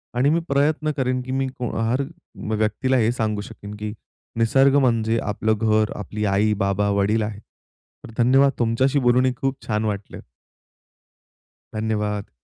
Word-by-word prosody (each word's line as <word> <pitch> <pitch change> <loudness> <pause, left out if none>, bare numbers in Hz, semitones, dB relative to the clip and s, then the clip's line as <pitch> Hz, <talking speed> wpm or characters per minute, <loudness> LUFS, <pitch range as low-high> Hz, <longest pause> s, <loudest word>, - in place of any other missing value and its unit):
आणि 130 +3 +3
मी 165 +3 +3
प्रयत्न 150 +2 +1
करेन 130 -1 0
की 125 +1 -7
मी 135 0 0
हर 120 +2 0 0.6
व्यक्तीला 110 +5 +1
हे 115 -1 +3
सांगू 110 -4 -1
शकेन 105 0 -9
की 105 0 -5 0.4
निसर्ग 135 +5 +4
म्हणजे 115 -3 +2
आपलं 110 +1 0
घर, 110 -1 +2
आपली 105 +2 -4
आई, 105 +2 +2
बाबा, 100 0 0
वडील 100 +2 +1
आहेत. 105 -1 -5 0.6
तर - - -11
धन्यवाद 135 +3 +5
तुमच्याशी 130 +4 +2
बोलून 125 0 +3
ही 130 - +1
खूप 135 +1 -2
छान 105 -1 0
वाटलं. 100 -2 -4 1.6
धन्यवाद. 105 -1 -2
115 Hz, 145 wpm, -22 LUFS, 105-130 Hz, 1.6 s, धन्यवाद